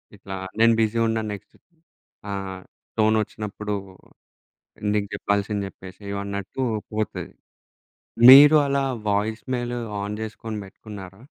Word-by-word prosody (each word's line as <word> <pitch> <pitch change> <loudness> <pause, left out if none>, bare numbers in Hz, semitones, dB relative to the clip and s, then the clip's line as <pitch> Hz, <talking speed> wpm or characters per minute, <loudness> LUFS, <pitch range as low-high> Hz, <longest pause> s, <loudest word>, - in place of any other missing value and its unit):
ఇట్లా 95 -1 -8 0.2
నేను 115 0 +6
బిజి 110 +1 +1
ఉన్నాను 110 -1 -1
నెక్స్ట్ 100 - -11
ఇప్పుడు 170 - -41 0.5
ఆహ్, 95 -1 -5 0.4
టోనొచ్చినప్పుడు, 105 -1 0 1.2
నీకు 105 -1 0
జెప్పాల్సింది 100 0 -1
జెప్పేశేయి 95 +1 -9
అన్నట్టు 100 +5 -5 0.3
పోతది. 110 0 -3 1.0
మీరు 145 +3 +10
అలా 140 0 +1 0.3
వాయిస్ 105 +2 -1
మెయిల్ 120 -1 -2 0.3
ఆన్ 105 +1 -4
జేసుకొని 110 0 -6
బెట్టుకున్నారా? 95 0 -11
105 Hz, 105 wpm, -24 LUFS, 100-110 Hz, 1.2 s, మీరు